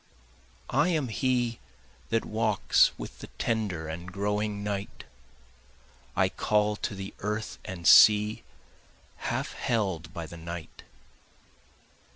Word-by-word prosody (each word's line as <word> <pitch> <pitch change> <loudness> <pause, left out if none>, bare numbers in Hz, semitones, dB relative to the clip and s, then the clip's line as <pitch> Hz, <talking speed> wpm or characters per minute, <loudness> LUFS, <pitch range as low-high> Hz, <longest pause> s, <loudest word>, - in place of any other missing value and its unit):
I 145 +6 +3
am 155 -8 0
he 120 0 0 0.5
that 115 0 +1
walks 110 -3 +3
with - - -8
the - - -8
tender 100 -8 -1
and 85 +3 -6
growing 105 +1 -1
night, 100 -1 -4 1.1
I - - +4
call 105 0 +1
to 105 - -3
the 95 0 -7
earth 105 +2 -3
and 85 -2 -4
sea 105 0 +7 0.8
half - - -3
held 95 -8 -1
by 85 - -6
the 85 +1 -10
night. 85 0 -8
105 Hz, 115 wpm, -28 LUFS, 90-110 Hz, 1.1 s, sea